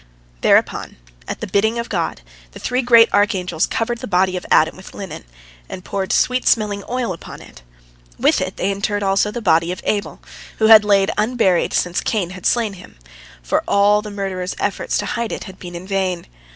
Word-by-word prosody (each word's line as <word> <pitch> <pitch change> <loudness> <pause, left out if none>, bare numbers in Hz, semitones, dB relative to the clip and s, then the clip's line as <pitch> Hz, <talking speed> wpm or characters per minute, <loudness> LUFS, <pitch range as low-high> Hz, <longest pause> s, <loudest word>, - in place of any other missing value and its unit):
" - - -32
Thereupon, - - +2 0.3
at - - -5
the - - -4
bidding 220 +3 +1
of 235 0 -3
God, 170 - -3 0.3
the - - -10
three 250 +1 -1
great 235 -2 +6
archangels 185 -5 +1
covered 235 +1 -2
the - - -6
body 185 -1 +1
of 180 - -5
Adam 160 +1 +4
with 190 - -13
linen, 195 - -8 0.4
and 185 - -8
poured 195 -1 -3
sweet 250 0 +1
smelling 205 -3 +1
oil 245 -5 -1
upon 165 - -10
it. - - -15 0.6
With - - +2
it - - -4
they 195 - 0
interred 205 +1 -2
also 195 +1 +2
the 235 +2 -6
body 165 -2 +3
of 180 - -5
Abel, 205 -1 -2 0.4
which 220 0 +4
had 215 -1 +10
lain 200 -1 +3
unburied 215 -5 +1
since 175 0 0
Cain 195 -6 -1
had 185 -2 -3
slain 230 -4 +1
him, 185 - -14 0.5
for - - 0
all 205 +1 +4
the 210 - -8
murderer's 190 -3 -4
efforts - - -1
to - - -2
hide 235 -1 -3
it - - -5
had 190 -2 -12
been 175 -1 -9
in 175 +2 -7
vain. 190 -3 -2
200 Hz, 200 wpm, -19 LUFS, 185-220 Hz, 0.6 s, had